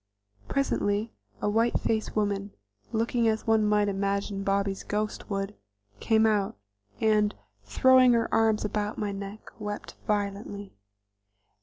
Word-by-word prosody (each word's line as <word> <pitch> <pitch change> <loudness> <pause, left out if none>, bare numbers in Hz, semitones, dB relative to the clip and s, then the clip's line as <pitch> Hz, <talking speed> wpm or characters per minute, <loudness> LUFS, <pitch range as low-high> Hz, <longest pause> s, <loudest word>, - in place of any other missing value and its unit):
Presently 220 -5 0 0.3
a - - +2
white 225 +3 +2
faced 220 -1 -1
woman, 200 -1 -1 0.4
looking 230 +1 +1
as 220 0 0
one 220 -1 +3
might 210 0 +3
imagine 200 0 -1
Bobby's 195 0 0
ghost 210 +1 -3
would, 195 0 -2 0.5
came 220 0 +3
out, 205 - +1 0.4
and, 215 -1 +2 0.3
throwing 260 -1 +5
her 230 -1 +2
arms 220 -1 +3
about 210 0 -2
my 210 -1 -2
neck, 200 +2 -8
wept 210 -1 -5
violently. 205 -1 -2
210 Hz, 125 wpm, -28 LUFS, 200-220 Hz, 0.5 s, throwing